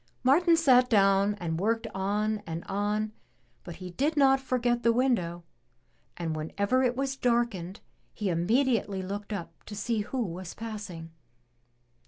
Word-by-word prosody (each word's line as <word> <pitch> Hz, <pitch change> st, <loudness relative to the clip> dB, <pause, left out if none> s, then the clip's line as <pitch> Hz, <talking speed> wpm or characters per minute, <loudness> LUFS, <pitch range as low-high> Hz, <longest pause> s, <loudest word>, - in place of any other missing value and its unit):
Martin 330 Hz, +6 st, +5 dB
sat 255 Hz, -6 st, +5 dB
down 200 Hz, -1 st, +4 dB
and 165 Hz, -4 st, -3 dB
worked 225 Hz, +4 st, 0 dB
on 210 Hz, +2 st, -1 dB
and 165 Hz, 0 st, -4 dB
on, 210 Hz, +2 st, -1 dB, 0.5 s
but 175 Hz, -, -8 dB
he 180 Hz, +1 st, -8 dB
did 290 Hz, -, 0 dB
not 270 Hz, -1 st, +5 dB
forget 245 Hz, -2 st, 0 dB
the 235 Hz, -, +4 dB
window, 230 Hz, -9 st, 0 dB, 0.7 s
and 165 Hz, -2 st, -3 dB
whenever 200 Hz, +11 st, 0 dB
it 250 Hz, -1 st, +1 dB
was 270 Hz, +1 st, -1 dB
darkened, 235 Hz, -8 st, -1 dB, 0.3 s
he 210 Hz, -, -4 dB
immediately 200 Hz, +2 st, +1 dB
looked 200 Hz, +3 st, -5 dB
up 200 Hz, -5 st, -6 dB
to 210 Hz, -, -9 dB
see 220 Hz, +2 st, -1 dB
who 240 Hz, +4 st, -2 dB
was 180 Hz, 0 st, -7 dB
passing. 205 Hz, -7 st, -7 dB
210 Hz, 145 wpm, -28 LUFS, 185-250 Hz, 0.7 s, Martin